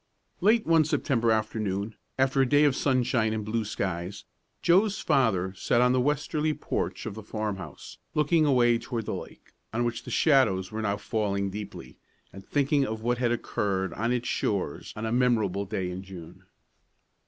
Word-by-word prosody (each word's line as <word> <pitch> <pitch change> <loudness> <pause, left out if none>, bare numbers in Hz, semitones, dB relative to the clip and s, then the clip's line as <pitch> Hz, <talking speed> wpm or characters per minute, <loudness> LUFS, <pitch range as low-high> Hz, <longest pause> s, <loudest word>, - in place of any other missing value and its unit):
Late 215 +5 +3
one 165 -1 +5
September 130 -6 +1
afternoon, 110 -1 -1 0.2
after 135 +1 +3
a 130 - +2
day 145 +1 +5
of 145 -3 +4
sunshine 125 -4 +1
and 110 -1 -3
blue 110 +1 -1
skies, 95 -2 -4 0.4
Joe's 195 +4 +4
father 95 -8 +1
sat 95 +5 +1
on 125 0 +4
the 130 0 +2
westerly 150 +2 0
porch - - -3
of 110 - -4
the 110 - -8
farmhouse, 105 -5 -6 0.2
looking 155 +2 +3
away 120 -5 +4
toward 115 -3 -4
the - - -3
lake, - - -9 0.2
on 120 +2 0
which 120 -1 -2
the - - -9
shadows 110 - +3
were 110 0 -3
now 100 -1 0
falling 100 -3 -1
deeply, 105 +1 -8 0.3
and 95 +1 -10
thinking 140 +2 +1
of 110 -4 -4
what 120 +1 0
had 120 -2 +1
occurred 95 -6 -1
on 115 +6 -1
its 125 -1 -1
shores 95 -8 -2
on 110 - -4
a 110 - -2
memorable 115 -6 +1
day 95 -2 -3
in 90 +1 -5
June. 95 -4 -11
115 Hz, 175 wpm, -27 LUFS, 100-130 Hz, 0.4 s, one